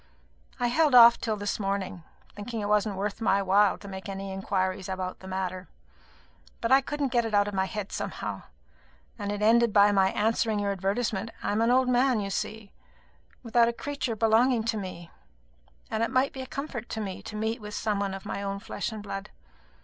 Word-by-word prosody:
I 245 - +1
held 300 +1 +3
off 235 -1 +9
till 220 -2 -1
this 205 +1 -2
morning, 195 -3 -2 0.3
thinking 220 +3 -5
it 205 - -2
wasn't 210 -1 +1
worth 200 +3 -3
my 200 -2 +3
while 195 +1 +4
to 200 - -12
make 190 0 -7
any 195 0 -5
inquiries 190 0 -2
about 185 -1 -4
the 190 - -11
matter; 185 -1 -4 0.9
but 230 - -2
I 270 +1 +7
couldn't 285 -1 -2
get 240 -2 +2
it 225 -2 -1
out 205 0 +4
of 205 - -4
my 190 0 +1
head 205 0 -5
somehow; - - -4 0.8
and 205 0 -3
it 205 0 -3
ended 235 +1 +5
by 205 0 +6
my 195 -1 +4
answering 220 0 +1
your 205 -1 0
advertisement. 200 +3 -1
I - - 0
am 210 +2 +1
an 230 - +3
old 255 +1 +4
man, 250 -1 +3
you 200 -1 -3
see, 215 +1 -4 0.7
without 235 0 +3
a 235 - 0
creature 280 -2 -3
belonging 225 +2 +3
to 225 0 -1
me; 185 -4 -7 0.8
and 220 - -1
it 230 - +1
might 260 +1 +1
be 265 - -6
a 260 - -7
comfort 275 -5 -5
to 220 - -4
me 195 -3 -5
to - - -8
meet 220 +2 -2
with 210 0 -7
some 210 -2 -1
one 195 -1 -2
of 195 - -9
my 200 - -4
own 200 0 -3
flesh 200 +2 -4
and 215 -2 -7
blood. 195 -1 -6
210 Hz, 210 wpm, -27 LUFS, 195-235 Hz, 0.9 s, off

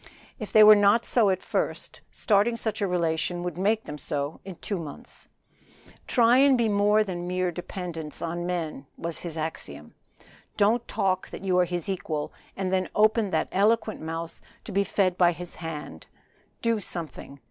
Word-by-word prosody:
If 215 - -6
they 215 - +8
were 215 0 +10
not 205 +3 +4
so 225 -5 +3
at 185 -1 -1
first - - -3
starting 215 +2 +2
such 220 -2 -3
a 200 - +2
relation 175 0 -1
would 175 -1 -3
make 210 +5 +1
them 150 0 -7
so 145 +2 -3
in 190 -2 -8
two 200 +2 -4
months. 150 -4 -10 0.8
"Try 240 0 +5
and 275 -1 +5
be 235 -2 +2
more 210 +1 +3
than 175 -3 -5
mere 180 0 0
dependents 170 -3 -6
on 175 +1 -3
men," 160 -6 -3
was 170 -1 -3
his 165 -2 -6
axiom. 80 - -6 0.6
"Don't 225 +4 +2
talk 185 -1 -1
that - - -9
you 185 -2 +2
are 180 - +4
his 175 -1 -4
equal, 160 -6 -3 0.2
and 190 -1 -2
then 185 -1 +1
open 215 0 +3
that - - 0
eloquent 215 +2 +1
mouth 165 +1 -6 0.2
to - - -8
be 200 +1 +2
fed 185 -2 0
by 175 -1 +5
his 175 +1 -8
hand 160 -3 -7 0.6
do 230 -2 +2
something! 160 -6 -7
185 Hz, 175 wpm, -26 LUFS, 165-210 Hz, 0.8 s, were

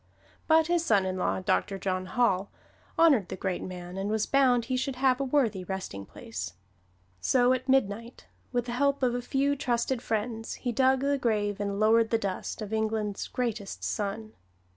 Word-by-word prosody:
But 320 0 +5
his 345 0 +1
son 205 - +3
in 185 0 -2
law, 185 0 -1
Doctor 195 +1 0
John 185 -1 -2
Hall, 200 -3 +1 0.5
honored 280 - +5
the - - -4
great 185 -1 -2
man 180 0 -7
and 195 +1 -2
was 215 0 +1
bound 255 -4 +3
he 255 +1 -1
should 260 +1 -1
have 255 0 +2
a - - 0
worthy 255 -9 +1
resting 180 - -5
place; 80 - -7 0.7
so 245 - +3
at 255 +1 -3
midnight, 230 -2 0 0.3
with 245 -1 0
the 245 - -4
help 280 +2 +1
of 245 -1 +3
a 245 - -2
few 275 +3 +1
trusted 245 -2 -1
friends, 225 0 -3
he 245 - -3
dug 260 +2 +3
the 280 0 +1
grave 210 -4 0
and 200 -1 -2
lowered 225 +1 +4
the 225 - +2
dust 200 +1 -4
of 210 +1 -6
England's 220 -2 -1
greatest 225 -5 -3
son. 215 +1 -3
225 Hz, 185 wpm, -28 LUFS, 200-255 Hz, 0.7 s, But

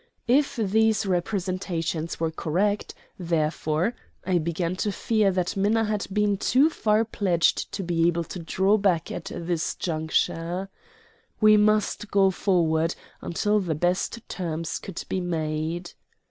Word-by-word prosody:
If 270 +4 +3
these 220 0 +2
representations 180 -3 -2
were 165 -1 0
correct, 195 +7 -1 0.2
therefore, 160 +2 0 0.3
I 185 -2 +2
began 170 +2 -2
to 205 - 0
fear 215 0 +1
that 180 -2 -1
Minna 210 +3 +2
had 210 -2 -2
been 205 0 +1
too 275 +10 +3
far 215 -4 +2
pledged 185 -6 +1
to 195 - -3
be 170 -1 +2
able 170 0 +1
to 180 - -7
draw 190 +5 +2
back 185 -5 +1
at - - -5
this 170 -1 -2
juncture. 165 +3 -1 0.7
We 215 -1 +7
must 210 0 +2
go 195 -1 +4
forward 165 -4 +1 0.3
until 210 +5 +1
the 175 -5 -2
best 180 +8 -1
terms 165 -3 -3
could 190 -3 -7
be 185 - -1
made. 165 0 -3
185 Hz, 135 wpm, -25 LUFS, 165-210 Hz, 0.7 s, We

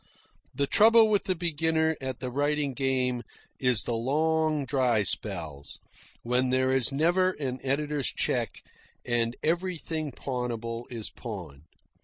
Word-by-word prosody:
The 140 - +1
trouble 225 +7 +6
with 205 -2 +1
the 185 -2 0
beginner 160 -1 +1
at 130 -2 -5
the 125 -1 -3
writing 145 +1 0
game 130 -2 0 0.4
is 125 -5 +2
the 120 - -2
long, 155 +4 +1
dry 125 -6 +2
spells, 80 -9 -2 0.4
when 125 +2 +1
there 130 +1 +2
is 130 +1 +3
never 175 +6 +2
an 130 -5 -4
editor's 145 +1 -1
cheque - - -1 0.4
and 120 -1 +1
everything 165 -3 -1
pawnable 120 -2 -4
is 115 -3 -3
pawned. 85 - -8
135 Hz, 130 wpm, -28 LUFS, 120-160 Hz, 0.4 s, trouble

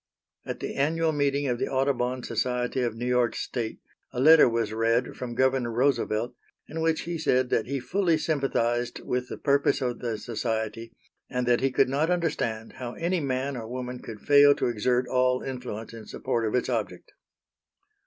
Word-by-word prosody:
At - - -5
the - - -3
annual 160 +3 +2
meeting 145 -1 0
of 120 -3 -1
the - - 0
Audubon 130 -2 0
Society 125 +2 -1
of 120 -3 -1
New 120 +2 -4
York 125 -1 +2
state 115 -3 -3 0.3
a - - -4
letter 155 0 +7
was 115 -2 -1
read 115 +2 +1
from 120 -2 -6
Governor 130 -1 +2
Roosevelt 120 -2 +1 0.3
in 160 +2 -5
which 160 0 +1
he 170 -1 -4
said 130 -4 +1
that 110 - +1
he 140 +1 -2
fully 170 +6 +1
sympathized 125 -6 0
with 125 0 -2
the - - -5
purpose 140 -1 +2
of 125 -3 -2
the 115 -3 -3
society 110 0 -3 0.4
and 125 -1 -2
that 120 -1 +3
he 135 - +2
could 130 - +3
not 145 +5 0
understand 145 -11 -1
how 120 -2 -5
any 175 +2 -1
man 135 -1 -2
or 115 -3 -6
woman 125 +1 -5
could 110 -4 -9
fail 145 0 +6
to - - -1
exert 125 +2 +1
all 125 0 +2
influence 125 -4 -6
in 110 -2 -10
support 115 -1 -2
of 105 - -1
its 125 - +1
object. - - -3
125 Hz, 185 wpm, -27 LUFS, 120-140 Hz, 0.4 s, letter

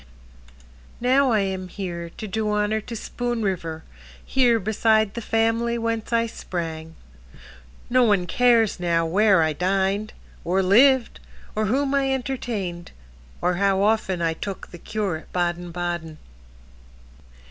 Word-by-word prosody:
Now 260 +2 +3
I 215 -2 +3
am 190 -1 -3
here 175 -3 -5
to 215 - -5
do 215 +2 -2
honor 210 +1 0
To 230 +2 -8
Spoon 240 +1 -3
River, 165 -5 -3 0.4
here 245 -3 +3
beside 220 0 +2
the 235 - -5
family 225 +1 +1
whence 230 -1 -2
I 230 0 +2
sprang. 165 -6 -6 0.9
No 255 +1 +3
one 205 -6 +3
cares 230 +1 +3
now 170 -1 +1
where 195 +1 +4
I 155 -1 +1
dined, 195 +5 0 0.3
Or 190 +3 +1
lived, 250 +6 +4 0.4
or 215 0 +1
whom 270 +5 +1
I 275 -1 +2
entertained, 230 -10 -3 0.5
Or 180 0 +1
how 195 0 +2
often 205 -5 +1
I 165 -1 +1
took 195 +4 -7
the 175 - -10
cure 200 -5 -2
at 155 - -15
Baden 175 0 -1
Baden. 170 -2 -4
205 Hz, 135 wpm, -23 LUFS, 175-230 Hz, 0.9 s, where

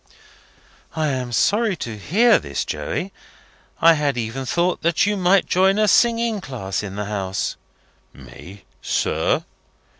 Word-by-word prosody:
"I 155 -1 0
am 130 -3 -3
sorry 210 - +1
to 115 -8 -6
hear 215 - +3
this, - - -4
Joey. 195 - -4 0.7
I 165 0 +6
had 145 -4 -1
even 120 +3 -4
thought 175 +6 0
that 170 +2 +2
you 205 0 0
might 190 0 +3
join 190 +2 +2
a 215 0 +3
singing 230 -1 +2
class 115 - -4
in 100 -2 -7
the 105 0 -3
house." 95 -2 -3 0.6
"Me, 95 +2 -13 0.2
sir? - - 0
160 Hz, 140 wpm, -21 LUFS, -, 0.7 s, I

